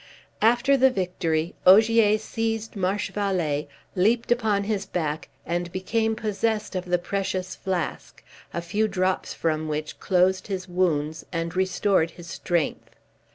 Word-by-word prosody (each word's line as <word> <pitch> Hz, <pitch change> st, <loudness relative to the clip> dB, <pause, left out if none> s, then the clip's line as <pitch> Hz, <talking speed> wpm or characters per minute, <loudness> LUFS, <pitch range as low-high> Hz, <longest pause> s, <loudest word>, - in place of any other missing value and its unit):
After 240 Hz, +5 st, +4 dB
the 265 Hz, 0 st, +6 dB
victory, 175 Hz, -6 st, -1 dB
Ogier 215 Hz, +2 st, +6 dB
seized 225 Hz, 0 st, -3 dB
Marchevallee, 190 Hz, -6 st, -1 dB, 0.3 s
leaped 225 Hz, +6 st, +2 dB
upon 220 Hz, -4 st, +2 dB
his 205 Hz, -1 st, -1 dB
back, 155 Hz, -5 st, -3 dB, 0.2 s
and 175 Hz, 0 st, -2 dB
became 220 Hz, +4 st, 0 dB
possessed 215 Hz, -1 st, -1 dB
of 185 Hz, 0 st, -2 dB
the 180 Hz, 0 st, +2 dB
precious 185 Hz, 0 st, -3 dB
flask, 185 Hz, -4 st, -4 dB, 0.3 s
a 170 Hz, -, -4 dB
few 205 Hz, +6 st, 0 dB
drops 185 Hz, -2 st, -1 dB
from 155 Hz, -1 st, -1 dB
which 155 Hz, 0 st, -4 dB
closed 185 Hz, 0 st, +2 dB
his 190 Hz, -2 st, -4 dB
wounds 160 Hz, -4 st, 0 dB
and 165 Hz, 0 st, -3 dB
restored 190 Hz, -2 st, +2 dB
his 170 Hz, +1 st, -12 dB
strength. 170 Hz, -1 st, -2 dB
185 Hz, 130 wpm, -25 LUFS, 170-215 Hz, 0.3 s, the